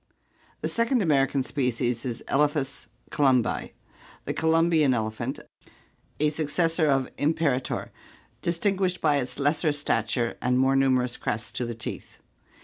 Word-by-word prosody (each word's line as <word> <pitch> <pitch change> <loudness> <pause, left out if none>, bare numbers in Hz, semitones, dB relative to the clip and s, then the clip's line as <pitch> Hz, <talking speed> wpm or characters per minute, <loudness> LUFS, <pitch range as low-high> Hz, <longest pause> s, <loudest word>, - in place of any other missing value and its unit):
The - - -1
second 230 0 +1
American 140 -4 +2
species 125 -3 -1
is 120 -2 -4
Elephas 140 -1 0 0.2
columbi, 130 -5 +1 0.5
the - - -2
Columbian 160 -4 +3
elephant, 110 +3 -3 0.8
a 150 +1 +3
successor 160 +2 +1
of 135 -2 +1
imperator, 145 -4 0 0.5
distinguished 185 +1 0
by 150 -2 +3
its 130 -2 -3
lesser 150 +3 +1
stat 120 -6 -1
ure 120 -2 -1
and 125 0 +1
more 135 +1 +3
numerous 130 -2 +2
crests 110 +2 -3
to 125 - -3
the 120 -1 -5
teeth. 115 - -7
140 Hz, 130 wpm, -26 LUFS, 125-160 Hz, 0.8 s, Columbian